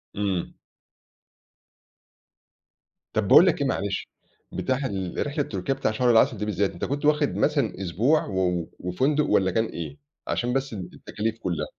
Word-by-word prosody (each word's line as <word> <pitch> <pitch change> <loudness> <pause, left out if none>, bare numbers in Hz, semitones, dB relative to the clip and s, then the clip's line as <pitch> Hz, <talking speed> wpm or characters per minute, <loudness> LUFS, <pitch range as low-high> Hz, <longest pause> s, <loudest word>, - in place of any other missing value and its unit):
إمم. 100 -3 -2 2.6
طب - - 0
باقول - - +8
لك - - +2
إيه - - +2
معلش، - - -2 0.5
بتاع 130 - 0
ال 95 +1 -2
رحلة 145 +1 -1
تركيا 100 +2 -2
بتاع 120 - -1
شهر 120 +3 +2
العسل 115 +1 +4
دي 105 - -3
بالذات، 100 -1 0
أنت - - -4
كنت 145 +2 -2
واخد 150 -1 +2
مثلًا 140 - 0
أسبوع، 115 - +2
و 95 -2 -2 0.2
و 85 - -7
وفندق 135 +12 +1
والَّا 95 -9 +2
كان 110 +5 +1
إيه؟ 80 -8 -6 0.3
عشان 120 +1 -1
بس 135 -2 -1
ال 90 -4 -6
التكاليف 110 +1 -4
كُلَّها؟ 90 -7 -2
110 Hz, 160 wpm, -25 LUFS, 95-135 Hz, 2.6 s, باقول